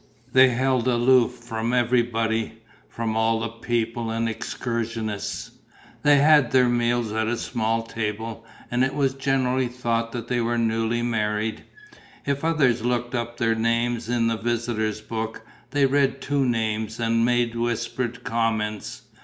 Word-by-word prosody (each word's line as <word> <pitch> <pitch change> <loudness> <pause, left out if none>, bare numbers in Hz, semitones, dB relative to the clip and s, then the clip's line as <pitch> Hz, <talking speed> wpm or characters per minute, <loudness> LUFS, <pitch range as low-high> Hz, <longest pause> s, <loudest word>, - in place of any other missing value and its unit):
They 130 0 +7
held 130 0 +1
aloof 125 0 +4
from 120 -1 -4
everybody, 115 -2 0 0.3
from 115 -1 -3
all 110 0 +2
the 115 - -2
people 115 0 -2
and 115 +1 -1
excursionists; 115 -1 -4 0.5
they 145 -1 +5
had 145 -3 +5
their 130 -1 +4
meals 120 -2 +1
at 110 0 0
a 120 +1 0
small 115 0 -1
table; 115 0 -4 0.3
and 120 +1 +2
it 135 +1 0
was 135 -2 +1
generally 130 -1 +1
thought 115 -2 -2
that 120 -1 -5
they 120 -1 0
were 120 +1 0
newly 115 +1 0
married. 110 -2 -1 0.6
If 140 0 -1
others 140 -8 +2
looked 120 0 -1
up 120 -1 -3
their 115 -1 +2
names 115 +1 0
in 120 -1 +1
the 115 -1 +1
visitors' 110 -2 -1
book, 110 0 -5 0.2
they 140 +1 +2
read 135 0 +2
two 140 0 0
names 110 -1 -1
and 115 0 +2
made 120 -1 +2
whispered 120 +1 -2
comments. 110 -2 -2
115 Hz, 145 wpm, -24 LUFS, 115-125 Hz, 0.6 s, They